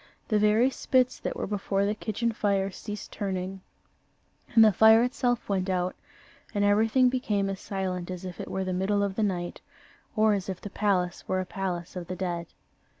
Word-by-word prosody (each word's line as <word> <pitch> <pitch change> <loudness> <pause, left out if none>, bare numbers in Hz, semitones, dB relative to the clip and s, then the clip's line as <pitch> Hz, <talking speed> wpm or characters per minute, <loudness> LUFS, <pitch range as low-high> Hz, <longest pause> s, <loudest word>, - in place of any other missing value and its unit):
The 215 -2 +3
very 215 +5 +4
spits 255 -1 +1
that - - -3
were - - -3
before 200 -1 -1
the 205 - +1
kitchen 220 +2 -2
fire 200 -3 0
ceased 210 +2 -7
turning, 190 -1 -4 0.9
and 225 -1 +9
the 215 - +6
fire 220 +4 +7
itself 245 -1 0
went 190 -1 0
out, 180 -1 0 0.6
and 205 0 +2
everything 220 +5 +4
became 210 -6 0
as 190 - -5
silent 185 -3 -3
as 185 0 -6
if 180 -2 -7
it - - -7
were 190 - -2
the 185 0 -2
middle 200 +2 +1
of 200 -1 -1
the 220 - -2
night, 180 -4 -2 0.5
or 215 -1 +4
as 195 -2 -2
if 185 -1 -4
the 205 - -8
palace 190 -4 0
were 185 - 0
a 185 - -2
palace 180 -4 -4
of 175 -2 -5
the 185 - -4
dead. 175 -2 -3
195 Hz, 195 wpm, -27 LUFS, 185-215 Hz, 0.9 s, and